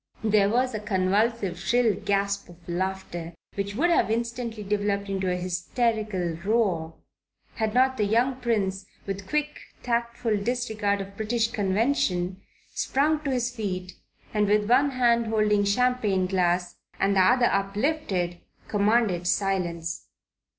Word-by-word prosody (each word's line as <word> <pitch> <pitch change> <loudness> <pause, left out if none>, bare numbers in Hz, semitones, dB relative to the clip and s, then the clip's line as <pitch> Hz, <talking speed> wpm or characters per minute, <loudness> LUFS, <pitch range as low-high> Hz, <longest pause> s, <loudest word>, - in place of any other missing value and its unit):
There 210 -2 +3
was 250 +3 +1
a 215 - -2
convulsive, 200 0 0
shrill 230 +3 +2
gasp 200 0 -1
of 175 0 -17
laughter, 175 -2 -4 0.2
which 200 0 -3
would 340 +8 +2
have 270 - +3
instantly 230 -1 -2
developed 200 0 -1
into 190 -1 -1
an 180 - 0
hysterical 185 -1 -1
roar, 190 -7 0 0.6
had 220 0 -1
not 260 +1 +3
the 210 - +2
young 240 +5 +2
Prince, 205 -6 -1 0.2
with 195 -1 -5
quick, 300 0 -1 0.2
tactful 235 -2 0
disregard 215 -2 -1
of 195 0 -9
British 225 +2 0
convention, 195 -3 0 0.3
sprung 300 +3 +1
to 285 - -2
his 250 -1 -1
feet, 185 -4 -4 0.4
and 210 -1 +2
with 210 0 +2
one 265 +5 +4
hand 235 -3 +2
holding 210 -2 +2
champagne 210 -3 +2
glass, 180 -1 0 0.2
and 195 0 +2
the - - +4
other 245 +6 +4
uplifted, 195 - 0 0.3
commanded 205 -4 +2
silence. 175 -4 -1
205 Hz, 135 wpm, -26 LUFS, 190-235 Hz, 0.6 s, one